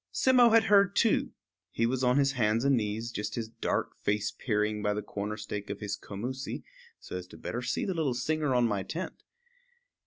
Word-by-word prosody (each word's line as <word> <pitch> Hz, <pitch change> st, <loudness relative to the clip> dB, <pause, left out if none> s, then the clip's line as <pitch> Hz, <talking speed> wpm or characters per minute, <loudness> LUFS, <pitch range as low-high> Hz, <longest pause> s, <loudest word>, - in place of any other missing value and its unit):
Simmo 250 Hz, -2 st, +5 dB
had 225 Hz, 0 st, +6 dB
heard 200 Hz, -3 st, +4 dB
too. 230 Hz, -, +3 dB, 0.4 s
He 115 Hz, -, 0 dB
was 130 Hz, +2 st, 0 dB
on 125 Hz, +1 st, +4 dB
his 140 Hz, -1 st, +4 dB
hands 115 Hz, -1 st, +1 dB
and 140 Hz, -1 st, +5 dB
knees, 110 Hz, +1 st, -2 dB
just 105 Hz, -1 st, -4 dB
his 115 Hz, -2 st, -3 dB
dark 115 Hz, -, -2 dB
face 105 Hz, 0 st, -1 dB
peering 105 Hz, -2 st, -1 dB
by 105 Hz, 0 st, 0 dB
the 105 Hz, -, -3 dB
corner 105 Hz, +1 st, -4 dB
stake 105 Hz, -1 st, -5 dB
of 100 Hz, -, -4 dB
his 105 Hz, -2 st, -3 dB
commoosie, 130 Hz, +7 st, -5 dB, 0.4 s
so -, -, -6 dB
as 90 Hz, 0 st, -7 dB
to 80 Hz, -, -13 dB
see -, -, -17 dB
better 120 Hz, -, -3 dB
the 125 Hz, +9 st, -1 dB
little 150 Hz, -7 st, 0 dB
singer 150 Hz, +1 st, 0 dB
on 120 Hz, -1 st, +4 dB
my 100 Hz, -3 st, -1 dB
tent. 170 Hz, -, -5 dB
115 Hz, 205 wpm, -30 LUFS, 105-140 Hz, 0.4 s, had